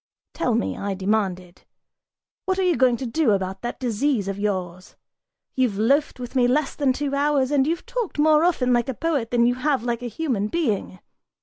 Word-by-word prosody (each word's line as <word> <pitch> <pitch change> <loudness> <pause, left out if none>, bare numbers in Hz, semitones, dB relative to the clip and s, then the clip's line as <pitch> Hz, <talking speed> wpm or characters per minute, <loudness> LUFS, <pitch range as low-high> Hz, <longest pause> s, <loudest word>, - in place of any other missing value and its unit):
"Tell - - 0
me," 95 -1 -1
I 200 -1 -3
demanded, 190 -3 -2 0.8
"what 375 0 0
are 380 - +1
you 360 -2 +2
going 255 -3 +3
to 265 - -5
do 245 -1 +2
about 190 0 -3
that 240 - -5
disease 245 -2 0
of 195 0 -4
yours? 185 -3 -3 0.6
You've 250 -6 0
loafed 275 +6 +1
with 245 +1 -7
me 245 -2 +4
less 275 +3 +1
than 280 -3 +1
two 280 +1 -3
hours, 280 -1 +1
and 280 -1 +2
you've 335 +2 -2
talked 480 -7 -4
more 305 +1 +4
often 270 -8 +2
like 240 +2 +1
a 265 - -3
poet 290 -7 -1
than 235 -1 +3
you 245 - +3
have 260 0 0
like 240 -1 -2
a 245 - -4
human 235 -4 -2
being! 215 - -2
250 Hz, 200 wpm, -23 LUFS, 210-295 Hz, 0.8 s, me